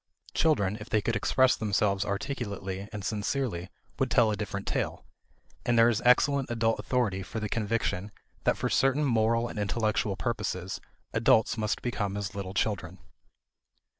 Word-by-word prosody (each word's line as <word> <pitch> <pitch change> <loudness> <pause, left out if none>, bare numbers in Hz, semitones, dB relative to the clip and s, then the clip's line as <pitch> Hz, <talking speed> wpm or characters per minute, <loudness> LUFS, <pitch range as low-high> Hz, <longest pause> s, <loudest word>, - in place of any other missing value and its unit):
Children, 105 -11 +2
if 110 - -9
they 110 - +3
could 110 +2 -1
express 130 +5 +3
themselves 100 -2 +1
articulately 100 -4 -4
and 105 -2 -6
sincerely, 105 -4 -2 0.3
would 130 - +1
tell 120 -4 +4
a - - 0
different 100 -1 -4
tale; - - -2 0.6
and 120 -1 +2
there 115 +1 +7
is 115 0 0
excellent 135 +2 +4
adult 115 -1 +1
authority 115 -7 0
for 110 +4 -5
the 110 - -2
conviction 105 -2 -1 0.3
that - - +2
for - - -1
certain 135 +4 +2
moral 115 -2 +2
and 110 - -6
intellectual 105 -1 0
purposes 100 -6 -3 0.3
adults 110 - +4
must 110 -2 -2
become 100 -5 -2
as 100 -1 -4
little 95 -1 -5
children. 95 -5 -1
110 Hz, 155 wpm, -29 LUFS, 100-120 Hz, 0.6 s, there